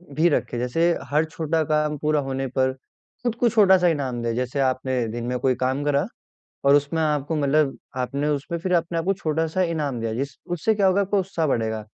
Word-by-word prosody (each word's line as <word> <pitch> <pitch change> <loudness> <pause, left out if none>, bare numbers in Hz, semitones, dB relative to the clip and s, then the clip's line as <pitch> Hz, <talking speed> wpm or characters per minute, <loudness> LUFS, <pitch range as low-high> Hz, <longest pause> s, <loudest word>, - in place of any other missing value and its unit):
भी 160 +4 +4
रखें। 125 -4 -1
जैसे 165 +8 +1 0.2
हर 150 +2 +2
छोटा 160 0 -1
काम 150 0 0
पूरा 150 +1 +1
होने 135 0 -3
पर 130 0 +2 0.5
खुद 235 -2 0
को 235 0 +2
छोटा 200 -4 +5
सा 180 -1 +2
इनाम 135 -7 -1
दें। 115 -1 -1
जैसे 125 +2 -2
आपने 130 -2 0
दिन 115 +1 -5
में 125 0 -1
कोई 130 -1 +2
काम 130 +3 -1
करा, 145 +2 +1 0.6
और 140 +1 +6
उसमें 145 +3 +1
आपको 150 0 0
मतलब 145 0 +2 0.2
आपने 140 +4 -1
उसमें 150 +3 -2
फिर 180 +2 -3
अपने 170 0 0
आपको 185 +4 +1
छोटा 160 -2 -1
सा 185 +4 -1
इनाम 150 -8 -1
दिया, 115 -1 -2
जिस 135 +2 -4 0.2
उससे 195 +6 +1
क्या 200 -2 +2
होगा, 190 +1 +3
आपको 200 0 +1
उत्साह 175 -4 -2
बढ़ेगा, 110 -4 -1
150 Hz, 210 wpm, -23 LUFS, 130-165 Hz, 0.6 s, और